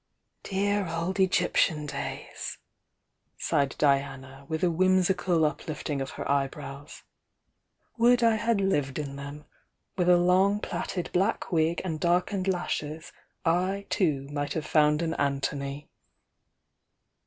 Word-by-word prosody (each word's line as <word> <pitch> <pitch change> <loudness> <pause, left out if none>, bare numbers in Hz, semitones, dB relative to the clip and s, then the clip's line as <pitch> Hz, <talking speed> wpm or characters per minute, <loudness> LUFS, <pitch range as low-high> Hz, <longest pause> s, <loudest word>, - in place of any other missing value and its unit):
"Dear 200 0 0
old 170 +4 -2
Egyptian 175 -4 +2
days!" 145 - -5 0.8
sighed 140 -1 0
Diana, 135 -1 0
with 160 +2 -2
a 175 - +3
whimsical 185 -1 +2
uplifting 150 -2 -3
of 135 - -3
her - - -4
eyebrows. 140 0 -3 1.0
"Would 240 +1 +5
I 225 -1 +4
had 225 0 +1
lived 145 -9 0
in 140 -2 -4
them! 140 +2 -8 0.5
With 180 -1 +2
a 180 - +7
long 185 +3 +3
plaited 180 -3 -4
black 195 +4 0
wig 165 0 +1
and 160 -4 -3
darkened 180 +3 +1
lashes, 160 -4 -2 0.3
I 185 +4 +1
too, 145 -7 +1
might 145 0 -2
have 160 - -3
found 150 +1 +3
an 165 -1 -1
An 140 -1 +1
thony!" 140 +1 -4
165 Hz, 125 wpm, -28 LUFS, 145-185 Hz, 1.0 s, a